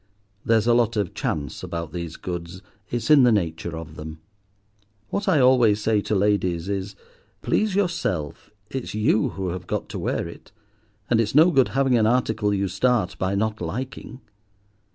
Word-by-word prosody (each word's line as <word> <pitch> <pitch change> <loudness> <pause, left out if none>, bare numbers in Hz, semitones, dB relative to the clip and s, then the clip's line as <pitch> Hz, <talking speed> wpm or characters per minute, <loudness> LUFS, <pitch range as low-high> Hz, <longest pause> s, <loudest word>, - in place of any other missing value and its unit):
There's 115 -1 +2
a 120 - +4
lot 115 -1 +2
of 100 -4 -1
chance 70 -3 -3
about 85 -2 -5
these 85 -2 -5
goods, 90 +1 -6 0.3
it's 120 +5 -1
in 150 -2 +8
the 125 -1 +5
nature 85 -4 -1
of 80 -1 -9
them. 80 +1 -8 0.9
What 200 - -2
I 170 -6 +4
always 125 -5 +5
say 110 -1 +1
to 105 - -1
ladies 95 -4 +1
is—'Please 100 - -3
yourself, 165 - -2 0.2
it's 130 -5 -5
you 110 0 +2
who 95 -2 -4
have 90 0 -6
got - - -3
to - - -5
wear - - -2
it; 85 - -13 0.6
and 115 -2 +3
it's 110 +3 -2
no 160 +4 +7
good 135 -6 +4
having 135 -3 +3
an 110 - +3
article 110 -3 +1
you 100 -1 0
start 105 +1 +1
by 95 +1 0
not 110 +1 -1
liking. 125 +8 -6
105 Hz, 170 wpm, -24 LUFS, 90-125 Hz, 0.9 s, in